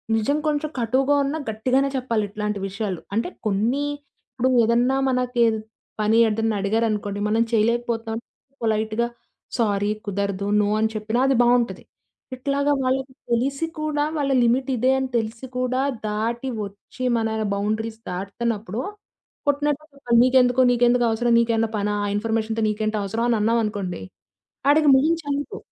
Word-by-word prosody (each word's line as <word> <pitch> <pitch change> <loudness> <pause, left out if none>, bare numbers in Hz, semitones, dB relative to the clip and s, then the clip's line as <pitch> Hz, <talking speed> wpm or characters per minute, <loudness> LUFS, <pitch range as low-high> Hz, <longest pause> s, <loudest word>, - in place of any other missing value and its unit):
నిజం 225 +7 +1
కొంచెం 300 0 0
కటువుగా 260 +5 +2
ఉన్న 280 +3 -2
గట్టిగానే 255 +5 +1
చెప్పాలి 235 -4 0
ఇట్లాంటి 210 0 -3
విషయాలు. 195 -2 -4
అంటే 225 - 0 0.2
కొన్ని 225 +8 +1 0.5
ఇప్పుడు 255 +1 +1
ఏదన్నా 240 +4 +2
మనకి 250 -1 -1
ఏద్ 220 -1 0 0.4
పని 215 +2 +3
ఏదైనా 220 0 0
అడిగారనుకోండి 210 -1 0
మనం 220 +2 +2
చేయలేకపోతున్నాం 230 0 0 0.5
పొలైట్‌గా 220 +1 0 0.5
సారీ 205 -3 +1 0.2
కుదరదు 200 0 -2
నో 205 - +2
అని 220 0 +2
చెప్పినా 220 +3 -1
అది 270 - +3
బావుంటది. 240 0 +2 0.5
ఇట్లాగా 280 +2 0
వాళ్ళకి 260 +1 -1 0.2
తెలిసి 275 +6 +1
కూడా 305 -1 0
వాళ్ళ 280 -2 0
లిమిట్ 250 +3 +2
ఇదే 255 +3 +3
అని 265 -1 -2
తెలిసి 225 +3 -3
కూడా 255 +1 0 0.3
దాటి 230 +5 -2 0.2
ఒచ్చి 200 +5 -10
మన 225 -1 0 0.3
బౌండరీస్ 220 +2 -2
దాటుతున్నప్పుడు, 210 +3 -3 0.7
కొట్టినట్టు 290 +1 +1
చెప్పాలి 245 -4 +1
నీకెందుకు 255 0 +4
నీకెందుకు 245 0 +3
అవసరం 235 +1 +1
నీకు 235 0 +2
ఏమన్నా 225 0 +1
పనా 205 0 0 0.2
ఇన్ఫర్మేషన్‌తో 225 +1 -1
నీకేంటి 215 0 -1
అవసరం 225 +4 -1
అని 230 - +3
అన్నామనుకోండి 210 - 0 0.7
ఆడికి 300 0 +4
మొహం 310 +5 +3
‌చెల్లదు. 290 +8 -3
230 Hz, 135 wpm, -23 LUFS, 215-260 Hz, 0.7 s, నీకెందుకు